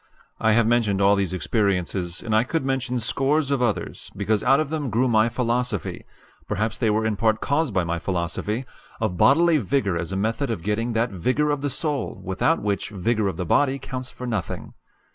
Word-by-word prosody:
I 110 -1 +3
have 115 +1 +4
mentioned 110 -4 +2
all 100 +1 +5
these 100 -3 0
experiences, 90 -1 -1
and 110 -2 0
I 110 - +4
could 135 +2 -2
mention 130 -2 -1
scores 140 +5 +1
of 140 -2 +1
others, 120 -4 -2
because 105 +1 +1
out 135 +3 +4
of 155 - -1
them 150 -4 -2
grew 120 +4 +2
my 110 -1 +3
philosophy 120 -4 -2 0.4
perhaps 110 +2 -1
they 115 - +2
were 110 +1 +1
in 110 -1 0
part 110 +1 +1
caused 145 +1 0
by 95 - +3
my 85 0 -2
philosophy 95 +7 -2 0.3
of 110 -5 -1
bodily 160 - +5
vigor 110 -5 0
as 85 +2 -4
a - - -2
method 115 +8 -1
of 110 -8 -3
getting 115 +3 -1
that 115 +1 +1
vigor 130 - +1
of 145 -1 -1
soul 145 -2 -2
without 95 - 0
which 100 0 -1
vigor 105 +2 0
of 95 - -3
the 90 - -2
body 135 - +2
counts 130 -1 -6
for 125 - -8
nothing. 105 -8 -4
115 Hz, 200 wpm, -24 LUFS, 100-130 Hz, 0.4 s, all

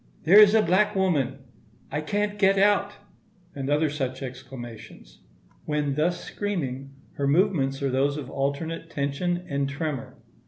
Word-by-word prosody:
"There 195 +5 +7
is 210 0 +8
a 220 - +5
black 200 +5 +2
woman!" 150 -9 +1 0.5
"I 150 - -1
can't 205 +5 -2
get 195 -1 +4
out!"—and 195 -6 -2
other 150 +2 +2
such 130 -2 -3
exclamations. 120 - -10 0.5
When 150 -2 -1
thus 170 +5 0
screaming, 140 -9 -4 0.2
her 140 - 0
movements 140 -5 +1
are 135 - 0
those 140 +3 +1
of 145 -4 -6
alternate 140 +5 -3
tension 175 +6 -2
and 140 -1 -1
tremor. 145 -2 -4
150 Hz, 140 wpm, -25 LUFS, 135-185 Hz, 0.5 s, is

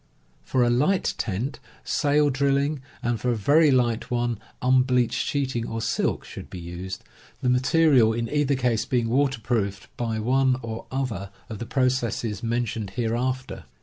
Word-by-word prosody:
For 130 -2 +1
a 120 - +3
light 150 +11 +2
tent, 115 +7 -2 0.2
sail 145 -1 +2
drilling, 140 +1 +1 0.2
and 115 -2 -1
for 125 - 0
a 120 - +2
very 145 +9 +4
light 125 -3 +1
one, 120 -3 -1 0.2
un 130 0 +4
bleached 125 -1 +1
sheeting 130 -5 -1
or 115 - -3
silk, 110 - -1
should - - -9
be - - -7
used, 90 +2 -7 0.4
the 125 - +2
material 130 -1 +4
in 115 +1 -2
either 145 0 +1
case 120 -4 +1
being 120 -3 0
waterproofed 115 -6 -1
by 115 -2 -1
one 130 +3 +2
or 115 -1 -6
other 120 -8 -3 0.2
of 110 -3 -6
the 120 - -5
processes 120 -5 0
mentioned 115 -3 -2
hereafter. 120 - -2
120 Hz, 155 wpm, -25 LUFS, 115-130 Hz, 0.4 s, very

